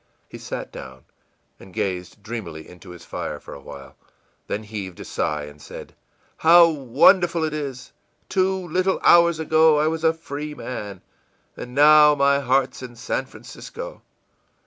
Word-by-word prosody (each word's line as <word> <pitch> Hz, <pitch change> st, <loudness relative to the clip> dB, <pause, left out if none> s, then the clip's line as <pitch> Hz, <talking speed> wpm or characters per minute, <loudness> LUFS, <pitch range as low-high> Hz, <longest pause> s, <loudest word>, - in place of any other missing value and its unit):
î -, -, -42 dB, 0.3 s
He -, -, -9 dB
sat -, -, -6 dB
down, 65 Hz, 0 st, -11 dB, 0.5 s
and 95 Hz, -, -14 dB
gazed 90 Hz, +1 st, -4 dB
dreamily 95 Hz, -9 st, -7 dB
into 90 Hz, +1 st, -14 dB
his 85 Hz, -1 st, -12 dB
fire -, -, -5 dB
for -, -, -12 dB
a -, -, -10 dB
while, 70 Hz, -1 st, -12 dB, 0.5 s
then 105 Hz, -, -3 dB
heaved 100 Hz, -4 st, -7 dB
a -, -, -8 dB
sigh 75 Hz, -1 st, -2 dB
and 75 Hz, 0 st, -12 dB
said: -, -, -11 dB, 0.5 s
ìHow 165 Hz, 0 st, +6 dB
wonderful 165 Hz, +6 st, +3 dB
it 155 Hz, -1 st, -2 dB
is! 140 Hz, -4 st, -6 dB, 0.4 s
Two 190 Hz, -1 st, 0 dB
little 185 Hz, +3 st, 0 dB
hours 170 Hz, -1 st, +6 dB
ago 160 Hz, -1 st, +4 dB
I 150 Hz, -, +2 dB
was 160 Hz, +1 st, -2 dB
a 160 Hz, -, +5 dB
free 150 Hz, -2 st, -7 dB
man, 105 Hz, -9 st, -7 dB, 0.5 s
and 125 Hz, 0 st, -9 dB
now 150 Hz, +1 st, +7 dB
my 140 Hz, 0 st, +3 dB
heart's 135 Hz, 0 st, 0 dB
in 125 Hz, -2 st, -9 dB
San 120 Hz, +3 st, -3 dB
Francisco! -, -, -10 dB
140 Hz, 160 wpm, -22 LUFS, 100-160 Hz, 0.5 s, now